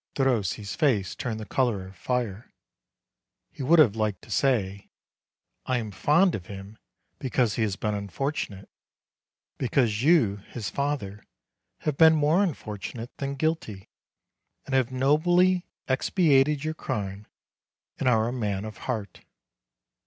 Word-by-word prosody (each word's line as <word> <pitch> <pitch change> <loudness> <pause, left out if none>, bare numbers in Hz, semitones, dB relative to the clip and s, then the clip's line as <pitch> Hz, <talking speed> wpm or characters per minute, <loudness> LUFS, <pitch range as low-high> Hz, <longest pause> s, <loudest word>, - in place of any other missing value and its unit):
Derossi's 110 - 0
face 120 - +1
turned 110 -3 -4
the 110 - -6
color 110 -3 0
of 95 +1 -12
fire. 120 -2 -3 1.0
He - - -9
would 155 +6 +4
have 125 -10 +6
liked 105 -4 -1
to - - -13
say: 100 -8 0 0.8
"I 130 - +1
am 110 -3 -4
fond 165 - +3
of 90 -4 -5
him 100 +2 -9 0.4
because 125 -4 +1
he 115 - -2
has 105 -3 0
been 105 +1 -2
unfortunate; 100 - -4 0.9
because 120 -4 +1
you, 130 - +4
his 105 +2 -7
father, 135 -8 -3 0.6
have 150 -3 -1
been 160 -1 +7
more 155 +5 +3
unfortunate 115 - -5
than 140 0 -3
guilty, 140 -10 -2 0.8
and 135 - -6
have 130 -1 +2
nobly 175 +7 +3 0.2
expiated 140 0 +3
your 155 0 -1
crime, 100 -8 -4 0.7
and 130 - +2
are 110 -2 +3
a 120 - -2
man 105 -5 -2
of 110 -1 -8
heart." 110 -6 -4
120 Hz, 135 wpm, -26 LUFS, 105-145 Hz, 1.0 s, been